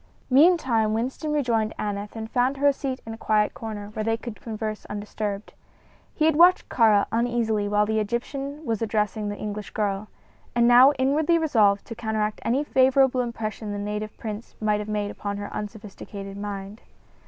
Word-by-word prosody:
Meantime 260 -8 +4
Winston 260 +7 -2
rejoined 235 -7 0
Aneth 205 0 -4
and 220 -1 -5
found 255 +3 +1
her 285 - -1
a - - +2
seat 270 -1 -4
in 225 - -6
a - - -8
quiet 210 -1 +2
corner, 210 -2 -6
where 215 - -3
they 225 +1 0
could 235 -2 -8
converse 215 -1 -4
undisturbed. 205 0 -5 0.6
He 310 - +2
had 320 -1 +4
watched 350 +3 +5
Kāra 215 -4 +4
uneasily 230 -3 0
while 210 0 +2
the 220 +1 0
Egyptian 275 +7 -4
was 225 -3 -1
addressing 210 -1 -1
the 205 - -5
English 210 -1 -5
girl, 205 -1 -2 0.5
and 235 0 +4
now 250 +3 +8
inwardly 290 +6 +2
resolved 215 -11 +3
to - - -7
counteract 220 -2 -2
any 265 +5 +1
favorable 265 -2 +3
impression 220 -3 -4
the - - -3
native 210 +1 -4
prince 215 0 -7
might 210 -1 +1
have 210 0 -5
made 205 -1 -1
upon 200 -1 -5
her 205 0 -6
unsophisticated 205 -1 -7
mind. 200 +1 -6
220 Hz, 175 wpm, -25 LUFS, 210-250 Hz, 0.6 s, now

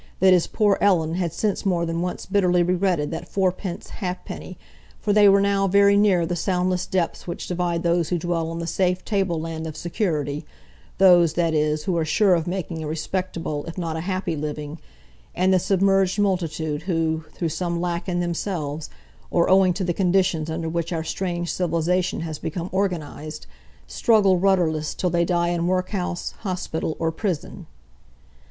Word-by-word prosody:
—that 185 0 +6
his 180 -2 +3
poor 205 -3 +2
Ellen 165 -5 +3
had 175 -2 -1
since 205 +4 -1
more 175 -3 +1
than 165 0 -2
once 180 0 -3
bitterly 180 -3 +2
regretted 180 -4 0
that 165 - -5
fourpence 185 -1 -2
ha'penny, 180 -1 -5 0.4
for 205 - 0
they 205 -1 +7
were 200 0 +6
now 200 0 +2
very 200 +1 +5
near 200 -4 +4
the 175 +1 -2
soundless 180 0 0
depths 185 -3 -2
which 175 - -5
divide 175 -1 -1
those 170 -1 +1
who 180 - +1
dwell 165 -1 -1
on 165 - -5
the 170 - -3
safe 180 +1 0
tableland 165 -5 -2
of 155 - -7
security—those, 160 - +1
that 170 -2 +1
is, 150 0 +1
who 185 - -1
are 165 - +1
sure 190 +5 +3
of 165 -1 0
making 175 -3 -3
a - - -4
respectable, 165 -1 -3
if 165 - -7
not 165 -3 -3
a - - -2
happy, 185 -1 -2
living—and 150 - -4
the 185 - +4
submerged 195 +1 +2
multitude 165 -6 -1
who, 165 -2 -1
through 170 - -1
some 170 +2 -2
lack 175 +1 -2
in 175 -1 0
themselves, 165 -4 -3 0.4
or 170 +1 +2
owing 190 -1 +5
to 185 +2 -2
the 175 -1 0
conditions 180 -4 +1
under 165 +1 -3
which 170 +1 -2
our 165 -2 -2
strange 175 0 -3
civilisation 180 0 0
has 160 -2 -5
become 170 +2 -4
organised, 155 -5 -3 0.4
struggle 205 -5 +3
rudderless 175 -5 +1
till 180 - -1
they 170 0 +2
die 175 -1 +1
in 175 0 0
workhouse, 185 -1 -2
hospital, 180 -5 -3
or 165 0 0
prison. 180 -1 -4
175 Hz, 170 wpm, -23 LUFS, 165-185 Hz, 0.4 s, they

